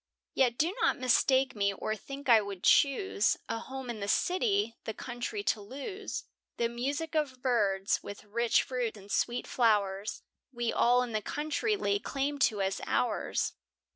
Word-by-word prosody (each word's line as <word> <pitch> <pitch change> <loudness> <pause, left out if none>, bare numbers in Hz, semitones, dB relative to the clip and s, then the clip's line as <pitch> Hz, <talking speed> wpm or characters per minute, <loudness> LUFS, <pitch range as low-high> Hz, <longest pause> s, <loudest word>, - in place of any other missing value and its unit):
Yet 245 -3 +2
do 335 +5 +1
not - - +3
mistake 260 +1 +3
me, 200 -1 +2
or 215 +2 -2
think 275 +6 -9
I 230 -3 +7
would 200 -3 -7
choose, 280 - +3
A 230 - -2
home 265 +1 -7
in 235 -3 -4
the 200 - -3
city, 375 - +1
the 220 - -4
country 245 - -4
to 220 - 0
lose; 285 - -6 0.3
The 235 - +2
music 280 +7 -3
of 275 -5 -1
birds, 200 -6 +1
with 200 - -8
rich 230 +3 +2
fruits 245 -4 -3
and 200 0 -12
sweet 240 0 0
flowers, 210 -3 +1 0.3
We 240 -2 -2
all 245 +1 +4
in 245 - -5
the 215 -1 -1
country 310 - -1
lay 200 - 0
claim 280 +5 -2
to 205 -3 -3
as 190 0 -1
ours. - - 0
240 Hz, 170 wpm, -30 LUFS, 210-275 Hz, 0.3 s, I